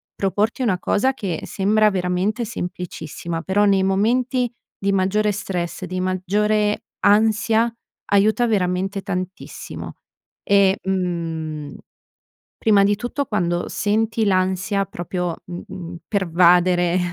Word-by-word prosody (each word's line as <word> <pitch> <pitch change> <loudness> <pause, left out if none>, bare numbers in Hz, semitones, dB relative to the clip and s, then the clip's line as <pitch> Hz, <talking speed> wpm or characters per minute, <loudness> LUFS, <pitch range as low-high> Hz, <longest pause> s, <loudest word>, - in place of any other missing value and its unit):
proporti 210 +6 0
una 205 -7 +2
cosa 260 +8 +1
che 190 -10 -4
sembra 215 +2 +2
veramente 190 +5 -1
semplicissima, 170 -4 -5
però 205 +3 +2
nei 195 -1 +3
momenti 240 +6 +1 0.3
di 200 0 0
maggiore 195 +2 +2
stress, 185 -3 -4
di 185 0 -4
maggiore 210 +3 0 0.2
ansia 220 +2 +3 0.4
aiuta 215 +4 +4
veramente 195 -2 0
tantissimo. 185 -1 -6 0.5
E, 200 -1 +4
mhmm, 165 -5 -3 0.8
prima 205 -3 +4
di 205 +1 +3
tutto 245 +5 -3
quando 175 -4 -1
senti 220 +2 0
l'ansia 190 +1 +1
proprio, 175 0 -3
mhmm, 175 0 -8
pervadere 180 -1 +3
195 Hz, 105 wpm, -21 LUFS, 180-210 Hz, 0.8 s, aiuta